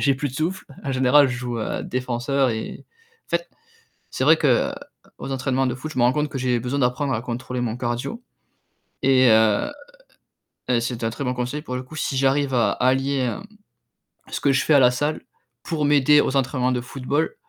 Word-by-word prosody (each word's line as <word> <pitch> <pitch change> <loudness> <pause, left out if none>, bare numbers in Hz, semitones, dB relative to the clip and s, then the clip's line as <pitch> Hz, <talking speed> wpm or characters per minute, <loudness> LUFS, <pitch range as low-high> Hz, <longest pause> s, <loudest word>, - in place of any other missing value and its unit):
j'ai 140 -1 +3
plus 145 +1 -3
de 130 - -12
souffle, 175 +6 -2 0.2
en 140 - -3
général, 130 +2 +4
je 125 - -3
joue 120 -1 -4
à 110 - -3
défenseur 130 +2 -1
et 110 -1 -5 0.4
en - - -46
fait, - - -10 0.6
c'est - - -2
vrai - - +6
que, - - 0 0.2
heu, - - -5 0.5
aux 135 - -5
entraînements 135 0 0
de 125 - -1
foot, 145 +5 -7
je 130 - -5
me - - +3
rends 125 +1 +4
compte 150 +1 -1
que 135 - -5
j'ai 125 -2 0
besoin 125 +4 -2
d'apprendre 130 +2 0
à 110 - -3
contrôler 125 +1 -4
mon 115 -1 -2
cardio 120 - -3 0.8
et 130 -2 +5
heu 110 - +3 1.0
et 120 -2 +3
c'est 120 -1 -4
un 115 - +1
très 135 +5 -5
bon 125 - 0
conseil 125 +4 -3
pour 125 -5 -6
le 125 - -4
coup, 155 +5 -11
si 140 - -2
j'arrive 135 +1 +1
à 120 -3 +3
allier, 135 +2 +1
hem, 130 +8 -2 0.9
ce - - -4
que 140 - +3
je 135 - +2
fais 155 - +3
à - - +7
la 125 -2 +5
salle 145 +4 -1 0.4
pour 155 -3 -2
m'aider 145 0 +5
aux 135 - -1
entraînements 130 -1 +1
de 125 - 0
football, 135 +5 -2
130 Hz, 215 wpm, -23 LUFS, 125-140 Hz, 1.0 s, à